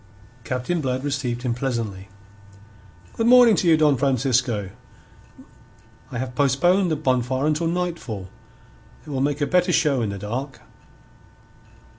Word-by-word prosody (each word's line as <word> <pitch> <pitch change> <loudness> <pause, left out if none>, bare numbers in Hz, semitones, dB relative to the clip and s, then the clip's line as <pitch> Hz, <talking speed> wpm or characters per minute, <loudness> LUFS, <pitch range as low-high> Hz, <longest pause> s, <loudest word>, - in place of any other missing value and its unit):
Captain 130 +8 -2
Blood 130 -1 -2
received 135 -4 -3
him 125 -2 0
pleasantly. 115 -7 -4 1.1
"Good 225 - -1
morning 245 -3 +7
to 180 - 0
you, 160 -1 +5
Don 150 -3 +3
Francisco. 125 -6 0 1.4
I - - -6
have 125 +1 -4
postponed 175 +8 +2
the 160 - 0
bonfire 130 -2 0
until 155 +2 0
nightfall. 165 - -3 0.8
It 150 - -9
will 135 -2 -2
make 145 +1 -1
a - - +3
better 180 +3 +2
show 145 -6 +2
in 110 - -1
the 100 - -5
dark." 125 +8 -5
135 Hz, 135 wpm, -22 LUFS, 125-155 Hz, 1.4 s, morning